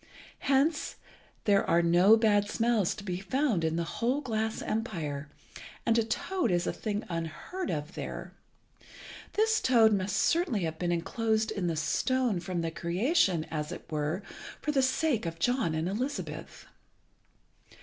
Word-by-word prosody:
Hence 285 +3 +2 0.5
there 200 -2 +4
are 170 +1 +4
no 180 +6 +6
bad 205 -2 +3
smells 225 -5 +1
to 200 - -9
be 180 -3 -3
found 215 - 0
in 160 0 +1
the 170 - 0
whole 235 - -1
glass 220 -5 -2
empire, 155 - -3 0.6
and 230 - +3
a - - +3
toad 355 +11 -1
is 175 -1 +1
a - - -1
thing 210 -1 -3
unheard 170 - -4
of 150 +2 -3
there. - - -6 1.0
This 445 +1 +2
toad 230 -4 +5
must 195 0 0
certainly 325 - +2
have 160 -2 -3
been 175 -1 0
enclosed 220 +5 0
in 200 -5 -2
the 165 - 0
stone 250 - +1
from 180 -1 -3
the 165 -1 -2
creation, 180 - +1
as 150 0 -3
it - - -7
were, 155 +5 -1 0.4
for 300 - -1
the 275 -2 +3
sake 260 - +1
of 165 0 -5
John 205 -4 +1
and 160 +2 -1
Elizabeth. 250 +9 -4
205 Hz, 155 wpm, -30 LUFS, 170-245 Hz, 1.0 s, no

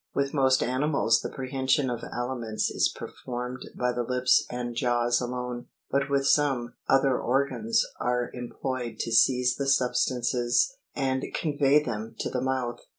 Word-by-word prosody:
With 140 0 0
most 130 -2 +3
animals 130 -2 +2
the - - -4
prehension 130 0 0
of 120 -1 -4
aliments 120 -3 -3
is - - +2
performed 125 0 -6
by 125 0 +1
the 120 - -1
lips 125 +1 +2
and 120 -1 -4
jaws 120 0 +1
alone; 125 0 -4 0.2
but 140 +1 +1
with 140 -1 +1
some, 135 -5 +2 0.2
other 135 -1 +3
organs 125 -3 +1
are 125 0 -1
em 125 -1 -6
ployed 130 -3 -4
to 115 - -3
seize 125 +2 +4
the 140 - -2
substances 125 - +2 0.2
and 130 -1 -1
convey 145 -1 +3
them 110 -3 -5
to - - -3
the 125 - -1
mouth. 130 -2 -2
125 Hz, 150 wpm, -27 LUFS, 120-135 Hz, 0.2 s, seize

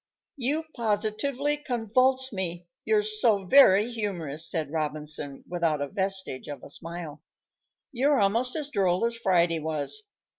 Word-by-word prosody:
"You 290 +5 -1
positively 235 +6 -1
convulse 255 0 +1
me, 175 -2 -3 0.2
you're 430 -1 +2
so 235 - +2
very 215 -1 +6
humorous," 170 -9 -1
said 155 -4 -3
Robinson, 150 -2 -3
without 165 -4 -1
a 145 - -2
vestige 190 -8 -1
of 145 -4 -8
a - - -10
smile. 165 -2 -7 0.7
"You're 275 +2 +2
almost 230 +6 +2
as 300 -3 -3
droll 190 -4 +1
as 235 0 -1
Friday 175 -7 +1
was. 155 - -1
195 Hz, 135 wpm, -26 LUFS, 165-255 Hz, 0.7 s, very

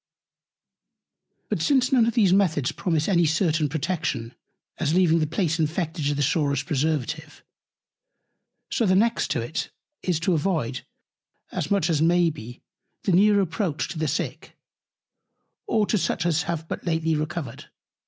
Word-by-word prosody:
But - - -2
since 265 -3 +2
none 240 -4 +4
of 230 - -1
these 200 -6 +4
Methods 160 -9 +2
promise 160 -4 -1
any 175 -4 +3
certain 160 -1 +1
Protection; 150 -6 -2 0.5
as 155 0 +1
leaving 170 -3 +4
the 155 - 0
Place 165 0 -1
infected 160 -1 -1
is 145 - 0
the 145 - 0
surest 140 0 0
Preservative, 155 +1 -2 1.3
so 230 - +1
the 185 - +4
next 230 +4 +2
to 120 - 0
it, 120 +8 -4 0.3
is 175 -4 0
to 180 +2 +1
avoid, 155 -7 -1 0.6
as - - -3
much 200 -1 +2
as 160 -4 +1
may 170 0 +3
be, 120 -3 -11 0.4
the 195 - +1
near 205 +3 +5
Approach 175 -4 -2
to 165 - -6
the 155 - 0
Sick, - - -4 1.1
or 215 -2 +2
to 215 - +1
such 170 -1 -1
as 160 -2 +2
have 165 -1 -3
but - - -5
lately 160 -2 0
Recovered. 150 -4 -4
165 Hz, 155 wpm, -24 LUFS, 150-185 Hz, 1.3 s, near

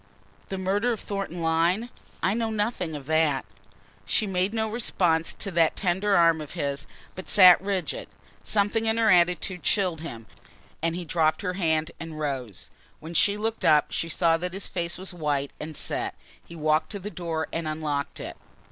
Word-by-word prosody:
"The 195 - -3
murder 200 +6 +1
of 225 - -2
Thornton 195 -4 -4
Lyne? 170 +8 +2 0.3
I 195 - +3
know 225 0 -1
nothing 210 -6 -1
of 140 -2 -7
that." 155 -2 +2 0.6
She 215 - +2
made 190 0 0
no 220 0 0
response 175 -7 +1
to 200 - -5
that 165 -2 +3
tender 195 +1 +2
arm 165 -2 +4
of 150 - -8
his, 140 0 -3 0.3
but 185 - -8
sat 185 -3 +8
rigid. 195 -2 -2 0.4
Something 215 +2 +1
in 220 0 +2
her 225 -2 +4
attitude 180 +1 +2
chilled 180 -6 +1
him 115 -9 -7 0.6
and 165 +1 0
he 175 0 -5
dropped 160 +2 +1
her 180 -2 -1
hand 160 -3 0
and 165 -2 -7
rose. 130 - -4 0.3
When 160 +2 -8
she 200 +3 +3
looked 220 +1 -2
up 150 -1 +4
she 165 - -2
saw 165 0 +3
that 180 +1 -4
his 195 +1 -2
face 170 -1 -3
was 190 +1 -4
white 145 -4 -1
and 155 0 -7
set. - - -2 0.3
He 170 - -12
walked 155 0 +1
to 200 - -4
the 205 +2 -6
door 165 -4 -3
and 165 -1 -2
unlocked 150 -2 -2
it. - - -7
175 Hz, 185 wpm, -26 LUFS, 160-200 Hz, 0.6 s, sat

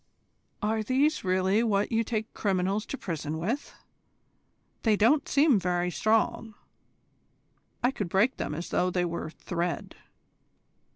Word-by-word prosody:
"Are 220 +1 +1
these 270 +7 +1
really 190 +3 +2
what 210 -2 +1
you 230 0 +2
take 220 0 -3
criminals 195 +1 0
to 275 - -4
prison 160 - -4
with? 225 - -3 1.1
They 220 -2 +3
don't 255 +8 +3
seem 280 -6 +4
very 180 0 0
strong. 220 +2 0 1.3
I 245 - +4
could 205 -9 -4
break 210 +9 +2
them - - -3
as 170 +3 -5
though 180 - +1
they 180 -1 0
were 170 -2 -4
thread." 170 +1 -4
205 Hz, 130 wpm, -28 LUFS, 180-230 Hz, 1.3 s, seem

